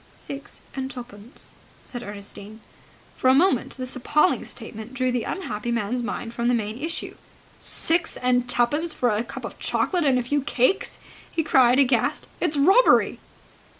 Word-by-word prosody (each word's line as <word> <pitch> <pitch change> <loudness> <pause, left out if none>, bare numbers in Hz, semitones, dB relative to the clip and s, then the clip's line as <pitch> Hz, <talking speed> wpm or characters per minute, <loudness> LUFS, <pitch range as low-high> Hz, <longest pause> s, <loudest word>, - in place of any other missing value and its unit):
"Six 275 0 -5
and 265 -1 -3
twopence," 240 -2 -9 0.4
said 245 - -7
Ernestine. 205 0 -9 0.6
For 255 - +2
a 260 - +6
moment 280 -5 +2
this 255 -1 -7
appalling 300 +7 +2
statement 220 +3 -8
drew 255 -1 +1
the 245 -2 -1
unhappy 240 - -4
man's 235 +1 -1
mind 235 -1 -4
from 235 0 -1
the 245 - +3
main 220 +1 -3
issue. 325 +4 -4 0.4
"Six 330 0 +2
and 250 -1 +1
twopence 290 +8 +1
for 245 -2 +1
a 210 +2 0
cup - - -8
of - - -8
chocolate 360 -3 0
and 270 -3 +3
a 250 - 0
few 290 +4 0
cakes?" 270 +7 +1 0.3
he 325 - 0
cried, 255 -4 +5
aghast. 275 +1 +2
"It's 315 -4 0
robbery!" 385 - +5
250 Hz, 160 wpm, -24 LUFS, 235-290 Hz, 0.6 s, a